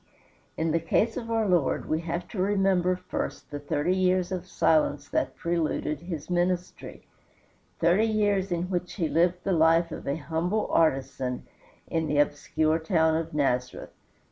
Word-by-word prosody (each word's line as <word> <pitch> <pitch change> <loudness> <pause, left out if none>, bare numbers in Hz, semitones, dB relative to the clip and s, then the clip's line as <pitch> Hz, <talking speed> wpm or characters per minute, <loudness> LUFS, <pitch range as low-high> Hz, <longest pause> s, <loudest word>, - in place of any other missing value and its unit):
In 160 0 0
the 165 - +2
case 215 +7 +1
of 230 -3 -5
our 225 -2 +1
Lord 175 -6 +1
we 160 +1 0
have 170 +1 -4
to 195 - -3
remember 190 -2 +2
first 180 -3 -5
the 145 - -4
thirty 145 +5 0
years 185 -1 +1
of 185 -1 -4
silence 160 -4 +1
that - - -1
preluded 165 -2 -1
his 165 -4 -6
ministry; 180 0 -2 0.7
thirty 180 +7 +3
years 205 -3 +1
in 170 0 0
which 180 -1 -2
he 170 -6 -1
lived 175 +3 +1
the 195 - -1
life 165 +1 +3
of - - -7
a 140 - 0
humble 170 +7 -1
artisan 135 -4 0 0.4
in 165 -1 -1
the 150 - 0
obscure 155 +2 +1
town 160 -1 +2
of 160 -2 -3
Nazareth. 125 -4 -1
170 Hz, 160 wpm, -27 LUFS, 155-185 Hz, 0.7 s, thirty